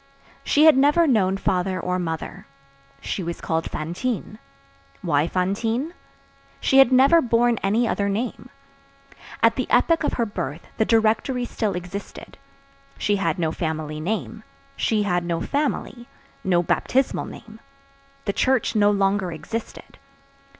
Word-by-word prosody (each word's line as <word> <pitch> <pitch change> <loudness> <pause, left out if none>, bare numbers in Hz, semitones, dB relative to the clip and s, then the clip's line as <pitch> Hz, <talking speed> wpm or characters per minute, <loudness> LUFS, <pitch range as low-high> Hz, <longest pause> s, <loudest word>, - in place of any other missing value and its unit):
She 300 +2 +4
had 315 - +8
never 295 +5 +4
known 195 -9 +2
father 185 -1 -1
or 180 0 -2
mother. 165 -2 -5 0.5
She - - -3
was 170 -1 -5
called 165 0 -2
Fantine. 210 +7 -4 0.6
Why 145 +2 +2
Fantine? 225 - -1 0.7
She 270 - +4
had 270 -2 +7
never 275 +6 +6
borne 235 -2 +2
any 220 +5 +1
other 200 -2 0
name. 225 +5 -3 0.9
At - - +4
the - - -2
epoch 330 -1 +3
of - - 0
her 235 - 0
birth 175 -6 -6
the 220 - +2
Directory 225 +3 +1
still 215 -4 -2
existed. 180 +3 -8 0.6
She 205 -1 +1
had 165 -5 -1
no 165 -3 0
family 155 -2 -4
name; 165 - -3 0.3
she 215 -2 +1
had 175 -3 0
no 170 -1 -2
family; 265 - -2 0.4
no 180 -4 +2
baptismal 260 +9 0
name; 220 0 -12 0.7
the 200 - -1
Church 260 0 +1
no 205 -1 +4
longer 195 -2 +1
existed. 170 +9 -7
205 Hz, 135 wpm, -23 LUFS, 175-240 Hz, 0.9 s, had